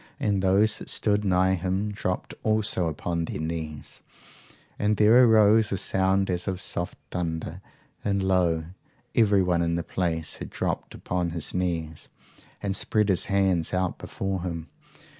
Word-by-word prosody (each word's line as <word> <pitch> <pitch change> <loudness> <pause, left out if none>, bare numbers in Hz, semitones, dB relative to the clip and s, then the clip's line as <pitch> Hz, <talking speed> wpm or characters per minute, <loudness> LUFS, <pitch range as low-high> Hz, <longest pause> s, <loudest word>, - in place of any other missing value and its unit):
And 100 -2 +1
those 100 +3 +3
that - - -7
stood 105 -1 +1
nigh 95 -1 +3
him 95 +3 -1
dropped 90 -3 -3
also 110 -5 +1
upon 85 +2 -2
their - - -5
knees, 80 -2 -5 0.8
and 105 0 +1
there 110 +4 +6
arose 110 -1 +5
a 95 - 0
sound 95 +1 +1
as 90 -1 -2
of 95 -2 -2
soft 90 -1 -3
thunder; 85 0 -4 0.4
and 100 -1 0
lo! 90 -4 +2 0.5
everyone 95 -6 +3
in 85 0 0
the 85 - -2
place 80 -3 -2
had - - -7
dropped - - -3
upon 90 -1 -2
his 85 -2 -4
knees, 85 -4 -3 0.5
and 100 -1 -1
spread 110 0 +1
his 95 - +2
hands 95 -4 +1
out 90 -1 -1
before 95 -2 -3
him. 85 -3 -5
95 Hz, 150 wpm, -26 LUFS, 85-100 Hz, 0.8 s, there